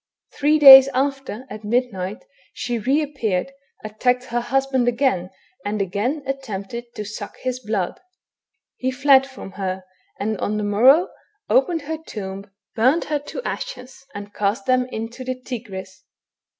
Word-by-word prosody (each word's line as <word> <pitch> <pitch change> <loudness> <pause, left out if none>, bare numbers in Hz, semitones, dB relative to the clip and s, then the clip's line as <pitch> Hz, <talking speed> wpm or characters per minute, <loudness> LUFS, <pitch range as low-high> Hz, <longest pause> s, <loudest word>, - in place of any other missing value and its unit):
Three 300 +2 +2
days 270 -2 +11
after, 270 -3 -2
at 210 +1 -9
midnight, 210 - -2 0.3
she 240 -1 -3
re 275 +8 +1
appeared, 250 -7 -2 0.3
attacked 245 +4 0
her 240 -1 -2
husband 265 0 0
again, 240 -8 +1 0.3
and 210 +1 -2
again 210 - -1
attempted 235 -3 -6
to 210 -2 -5
suck 205 0 -8
his 255 -1 -2
blood. 210 -6 -3 0.8
He 255 - -1
fled 270 0 +4
from 260 -7 -10
her, 190 -1 -4 0.4
and 215 0 -2
on 210 +1 -1
the 210 - -2
morrow 255 - +5 0.4
opened 350 -11 +2
her 315 +2 -4
tomb, 195 -5 -7 0.3
burned 260 +9 +3
her 295 -1 -1
to 290 - -8
ashes, 265 - -6
and 205 0 -8
cast 210 +6 -1
them 255 -1 +2
into 230 +1 -6
the 255 0 -4
Tigris. 195 -7 -8
245 Hz, 145 wpm, -22 LUFS, 205-270 Hz, 0.8 s, days